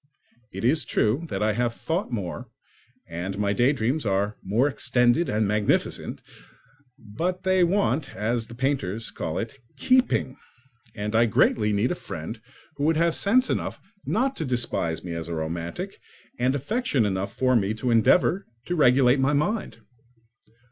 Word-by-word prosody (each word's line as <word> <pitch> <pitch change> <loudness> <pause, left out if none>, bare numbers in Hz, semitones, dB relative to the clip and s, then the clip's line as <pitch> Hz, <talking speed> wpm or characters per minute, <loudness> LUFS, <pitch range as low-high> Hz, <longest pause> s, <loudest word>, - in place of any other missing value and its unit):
It - - -4
is 150 +4 +3
true 120 +6 0
that 95 +2 -2
I 110 0 +2
have 120 +1 -1
thought 165 -2 -3
more 115 +3 -4 0.6
and 90 +3 -4
that - - -7
my 100 -1 +1
daydreams 130 +4 +1
are 100 0 0
more 110 +8 +1
extended 125 +2 +2
and 105 0 +1
magnificent, 105 0 0 0.7
but 165 - -4
they 185 -1 +3
want 170 -6 +1
(as 115 +1 -1
the 115 - -10
painters 115 -5 -2
call 80 +2 -4
it) 115 +4 -5 0.2
keeping; 255 - +2 0.6
and 105 +1 -3
I 115 +1 +5
greatly 105 0 +2
need 105 +4 +1
a 180 - -6
friend 100 +4 -6 0.4
who 145 - -1
would 160 0 +3
have 170 0 +2
sense 250 +9 +3
enough - - -2 0.2
not 265 +5 0
to - - -2
despise 120 - -1
me 90 -1 -5
as 85 0 -5
romantic, 85 +1 -4 0.4
and 130 +2 +2
affection 145 - 0
enough 95 -1 -2
for 130 -1 +1
me 105 -1 +1
to 120 +3 -1
endeavour 170 - +3 0.2
to 175 - -2
regulate 130 -3 +4
my 135 +2 +2
mind. 195 +10 -1
120 Hz, 155 wpm, -25 LUFS, 105-150 Hz, 0.7 s, I